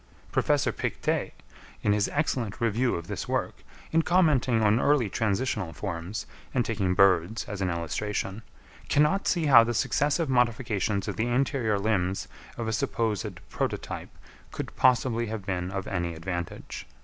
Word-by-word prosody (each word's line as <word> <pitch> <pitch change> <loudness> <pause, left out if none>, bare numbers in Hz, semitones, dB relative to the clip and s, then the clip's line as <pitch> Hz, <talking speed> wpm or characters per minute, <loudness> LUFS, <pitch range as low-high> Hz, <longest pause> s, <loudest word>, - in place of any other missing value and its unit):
Professor - - +2
Pictet, - - -2 0.5
in 105 - +3
his 105 -1 +2
excellent 125 -8 -1
Review 115 +2 +1
of 85 - -5
this 105 +1 -5
work, - - -2 0.3
in 165 - +4
commenting 145 -10 +3
on 105 +2 +4
early 140 -5 +3
transitional 105 -4 -1
forms, 95 +1 -4 0.3
and 120 -3 +2
taking 100 -5 0
birds 95 +2 +3
as 105 -2 -6
an 95 - +1
illustration, 95 +5 -3 0.5
cannot 150 +7 +3
see 170 -4 +2
how 125 -5 +8
the 120 +1 -2
successive 150 +7 +1
modifications 115 -5 +1
of - - -3
the 110 +2 0
anterior 120 -3 +1
limbs 100 -3 0 0.3
of 115 -2 -3
a 110 - -1
supposed 110 -1 -2
prototype - - -3 0.4
could - - -6
possibly 120 -2 +3
have 105 -3 -5
been 90 -2 -2
of 95 0 -4
any 85 -3 -2
advantage. 85 +1 -5
110 Hz, 150 wpm, -27 LUFS, 95-125 Hz, 0.5 s, how